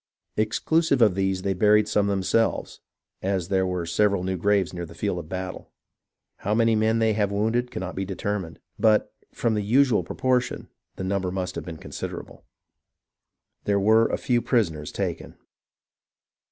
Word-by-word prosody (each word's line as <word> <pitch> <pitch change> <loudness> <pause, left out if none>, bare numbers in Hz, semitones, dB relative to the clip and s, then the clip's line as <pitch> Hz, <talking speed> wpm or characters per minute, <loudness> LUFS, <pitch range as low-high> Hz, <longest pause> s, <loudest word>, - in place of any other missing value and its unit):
Exclusive 140 +7 +1
of 110 -5 +5
these 95 0 -1
they 100 - +1
buried 105 +2 +4
some 105 -1 +2
themselves, 100 +3 0 0.2
— - - -64
as 95 -2 -1
there 95 -1 +2
were 90 -2 -2
several 100 +2 +1
new 95 0 -1
graves 100 0 +1
near 85 -1 -4
the 85 0 -10
field 90 0 -2
of 80 -2 -9
battle. 95 0 -5 0.7
How 105 +2 -1
many 115 0 +3
men 110 +1 +2
they 110 -1 +2
have 105 -1 0
wounded 115 +4 0
cannot 95 -3 -5
be 95 - -3
determined; 95 -2 -4 0.2
but, 110 -1 +3 0.2
from 115 - 0
the 105 - 0
usual 120 +3 +3
pro - - -7
portion, 125 -1 0 0.3
the - - -5
number 95 -1 -1
must 90 0 -3
have - - -6
been 85 -3 -7
considerable. - - -7 1.2
There 100 -1 +2
were 110 +3 +5
a - - -1
few 120 -1 +1
prisoners 80 - 0
taken. - - -4
100 Hz, 165 wpm, -25 LUFS, 95-110 Hz, 1.2 s, of